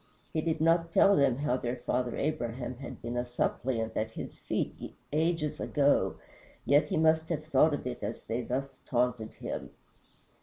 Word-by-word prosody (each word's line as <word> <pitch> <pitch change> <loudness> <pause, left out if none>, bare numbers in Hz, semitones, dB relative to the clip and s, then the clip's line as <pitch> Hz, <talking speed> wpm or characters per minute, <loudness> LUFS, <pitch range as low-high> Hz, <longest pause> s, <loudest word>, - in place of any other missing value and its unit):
He 160 - +1
did 160 0 -1
not 165 +1 +3
tell 200 +3 +6
them 140 -6 +4
how 135 -3 +1
their 120 -1 -2
father 125 0 -1
Abraham 125 -3 -2
had 135 - -9
been 120 +1 -3
a 120 - +1
suppliant 120 -2 -1
at 110 +1 0
his 110 - -8
feet - - -3 0.2
ages 160 -1 +1
ago, 145 -1 +2 0.5
yet 145 +4 +5
he - - -1
must 160 0 +3
have 155 -3 -2
thought 155 0 +4
of - - -7
it 125 -1 -4
as 105 +2 -4
they 115 +2 -2
thus 130 +3 -3
taunted 120 -3 0
him. - - -5
135 Hz, 175 wpm, -30 LUFS, 120-155 Hz, 0.5 s, tell